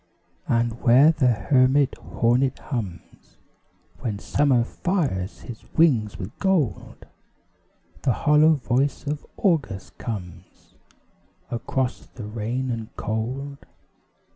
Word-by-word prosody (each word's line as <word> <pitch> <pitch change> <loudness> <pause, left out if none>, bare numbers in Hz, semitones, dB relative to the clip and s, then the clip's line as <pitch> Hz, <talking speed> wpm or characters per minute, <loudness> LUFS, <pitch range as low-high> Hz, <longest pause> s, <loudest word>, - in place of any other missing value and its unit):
And 115 0 0
where 130 +6 +6
the 150 -5 +1
hermit 130 +3 +3
hornet 125 +3 0
hums, 105 - -7 0.6
When 110 -4 -3
Summer 130 +2 +2
fires 130 - -2
his 115 -3 -9
wings 125 -11 +3
with 95 +4 -7
gold, 185 - -1 1.0
The 135 - +2
hollow 150 +6 +4
voice 130 +3 0
of 145 +1 -3
August 150 - -1
comes, 90 -5 -8 0.8
Across 125 +1 -2
the 115 - -7
rain 115 +4 -3
and 115 -2 -4
cold. 130 +6 -3
125 Hz, 100 wpm, -24 LUFS, 110-140 Hz, 1.0 s, where